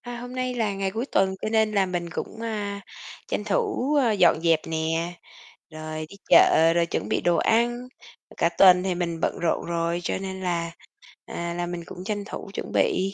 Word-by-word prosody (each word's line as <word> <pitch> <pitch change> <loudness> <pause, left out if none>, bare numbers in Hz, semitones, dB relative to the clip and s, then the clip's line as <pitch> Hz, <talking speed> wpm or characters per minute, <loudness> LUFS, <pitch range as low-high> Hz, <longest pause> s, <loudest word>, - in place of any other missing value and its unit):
À, 245 -1 -7
hôm 245 +1 -8
nay 255 0 -2
là 220 -4 0
ngày 195 0 -1
cuối 225 +6 -3
tuần 190 -7 +1
cho - - -1
nên 220 -1 +2
là 195 -2 +2
mình 175 -1 -3
cũng, 220 - -6
a, 205 -3 -3 0.5
tranh - - -2
thủ, 385 - 0
ơ, 235 - +3
dọn 175 -5 +4
dẹp 165 -2 +3
nè, 165 +2 -1 0.6
rồi 155 0 -6
đi 200 - -13
chợ 165 +1 +6
rồi 170 0 +2
chuẩn - - -3
bị - - 0
đồ 175 -1 +2
ăn, 240 +2 +1 0.5
cả - - +3
tuần 180 +1 +6
thì 185 -1 -1
mình 170 -2 -3
bận - - -1
rộn 170 -1 0
rồi 170 0 -1
cho - - -2
nên 190 0 -6
là, 170 -2 -1 0.6
à, 170 0 -4
là 175 0 -2
mình 175 -1 -5
cũng 180 - -9
tranh 205 +1 -3
thủ 200 - -7
chuẩn - - -5
bị. 195 +1 +1
185 Hz, 205 wpm, -25 LUFS, 170-220 Hz, 0.6 s, chợ